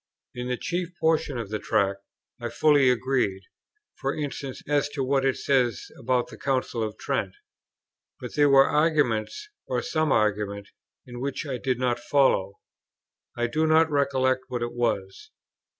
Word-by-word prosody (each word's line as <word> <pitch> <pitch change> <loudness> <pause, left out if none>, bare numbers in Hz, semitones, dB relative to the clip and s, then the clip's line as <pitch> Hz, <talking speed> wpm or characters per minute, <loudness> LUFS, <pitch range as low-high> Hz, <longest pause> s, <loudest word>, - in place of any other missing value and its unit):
In 125 0 -5
the 125 0 -1
chief 175 +3 -3
portion 160 -4 +1
of 115 -4 -5
the 110 - -2
Tract 100 0 0 0.4
I - - -3
fully 145 -4 +4
agreed; 125 -6 0 0.6
for 135 - -1
instance, 140 -2 -5
as 145 -1 +1
to 145 -2 -3
what 135 +1 +1
it 135 -1 +1
says 125 -5 0
about 125 +1 0
the - - -12
Council 130 -3 -1
of 110 -1 -3
Trent; 95 -1 -2 0.8
but - - -7
there 145 -1 +4
were 135 0 +7
arguments, 150 - +1 0.2
or 125 -1 -1
some 155 -2 0
argument, 100 -2 0 0.4
in 120 -1 -10
it - - -6
which 140 +3 -3
I 130 -4 -4
did 130 -1 -1
not 125 -1 0
follow; 130 -9 +2 0.8
I 120 - +1
do 155 +6 0
not 160 0 +4
recollect 130 -2 +1
what 125 -2 -3
it 120 - -4
was. 100 -5 -2
130 Hz, 165 wpm, -26 LUFS, 120-145 Hz, 0.8 s, were